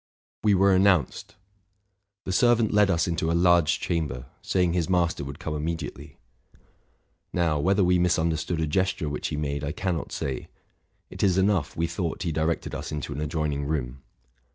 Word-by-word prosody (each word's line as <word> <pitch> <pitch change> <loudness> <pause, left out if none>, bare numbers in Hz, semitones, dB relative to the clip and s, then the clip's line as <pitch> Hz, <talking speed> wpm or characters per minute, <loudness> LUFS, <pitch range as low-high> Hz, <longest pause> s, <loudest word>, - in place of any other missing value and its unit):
We 105 -2 +4
were 95 +1 +4
announced. 95 -6 +2 0.9
The - - -4
servant 115 +2 +3
led 105 -1 +4
us 85 -2 +1
into 80 -1 -1
a - - +1
large 85 -4 +4
chamber, 75 -7 -2 0.2
saying 90 -2 +1
his 85 -1 0
master 85 -5 +1
would 70 +1 -7
come 80 -3 -5
immediately. 75 -2 -5 1.1
Now, 80 -4 +1
whether 95 +5 +2
we 90 0 +3
misunderstood 85 -1 0
a - - +1
gesture 85 -1 0
which 75 - -3
he 75 - -4
made, 70 -1 -2
I 75 +1 -2
can 95 -4 -1
not 80 - -5
say: 65 -2 -4 0.6
it - - -7
is 95 -2 +3
enough, 95 -5 +1
we 85 - +1
thought 85 0 -3
he 85 - -1
directed 80 +1 -1
us - - -5
into 75 -1 -4
an 70 - -5
adjoining 75 -2 -2
room. 65 -4 -3
85 Hz, 175 wpm, -26 LUFS, 75-90 Hz, 1.1 s, We